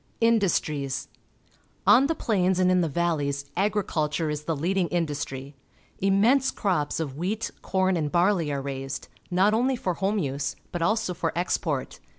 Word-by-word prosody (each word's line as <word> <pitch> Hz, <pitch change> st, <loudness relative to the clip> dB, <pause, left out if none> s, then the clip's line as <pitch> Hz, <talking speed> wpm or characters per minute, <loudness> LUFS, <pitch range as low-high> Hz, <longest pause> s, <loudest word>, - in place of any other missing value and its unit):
Industries. 170 Hz, -, +1 dB, 0.4 s
— -, -, -36 dB
On 275 Hz, -, +4 dB
the 325 Hz, -, 0 dB
plains 190 Hz, -8 st, +1 dB
and 185 Hz, 0 st, +3 dB
in 180 Hz, 0 st, +4 dB
the 165 Hz, -, 0 dB
valleys 145 Hz, -3 st, -1 dB
agriculture 170 Hz, -6 st, 0 dB
is 150 Hz, 0 st, -4 dB
the 165 Hz, -, 0 dB
leading 180 Hz, +4 st, 0 dB
industry. 145 Hz, -5 st, -3 dB, 0.5 s
Immense 215 Hz, +8 st, +3 dB
crops 175 Hz, -8 st, -1 dB
of 140 Hz, -4 st, -4 dB
wheat, 205 Hz, +6 st, -2 dB
corn, 190 Hz, -1 st, +1 dB
and 150 Hz, -3 st, -1 dB
barley 175 Hz, -3 st, +2 dB
are 140 Hz, -1 st, -2 dB
raised, 135 Hz, -1 st, -5 dB, 0.2 s
not 190 Hz, +4 st, +3 dB
only 255 Hz, +4 st, +2 dB
for 185 Hz, -7 st, -2 dB
home 195 Hz, +4 st, 0 dB
use 140 Hz, -5 st, -2 dB, 0.2 s
but 175 Hz, -, -3 dB
also 215 Hz, +1 st, +1 dB
for 170 Hz, -1 st, -2 dB
export. 160 Hz, -5 st, -1 dB
175 Hz, 160 wpm, -26 LUFS, 145-195 Hz, 0.5 s, On